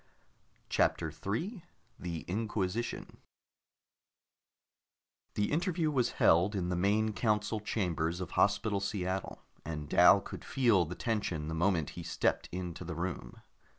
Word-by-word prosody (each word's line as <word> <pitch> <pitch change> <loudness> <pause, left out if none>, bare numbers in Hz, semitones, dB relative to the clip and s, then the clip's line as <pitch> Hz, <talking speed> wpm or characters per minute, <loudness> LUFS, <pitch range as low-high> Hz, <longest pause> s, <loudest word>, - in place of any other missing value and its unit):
CHAPTER 80 -2 +1
3 115 - -3 0.4
THE 85 -3 -4
INQUISITION 105 +2 -2 2.2
The 105 0 0
interview 165 0 +1
was 130 -4 +1
held 90 +6 +4
in 90 -2 -1
the 90 - 0
main 105 +4 +2
council 105 0 0
chambers 90 -5 -1
of 90 - -5
Hospital 100 0 +2
Seattle, 95 -2 -3 0.2
and 75 -2 -5
Dal - - +7
could - - -9
feel 115 -9 +3
the 90 +4 -6
tension 90 -10 -2
the - - -3
moment 85 -2 +1
he - - -7
stepped - - 0
into 90 -1 -5
the 85 -1 -5
room. 85 +3 -5
95 Hz, 125 wpm, -32 LUFS, 85-110 Hz, 2.2 s, Dal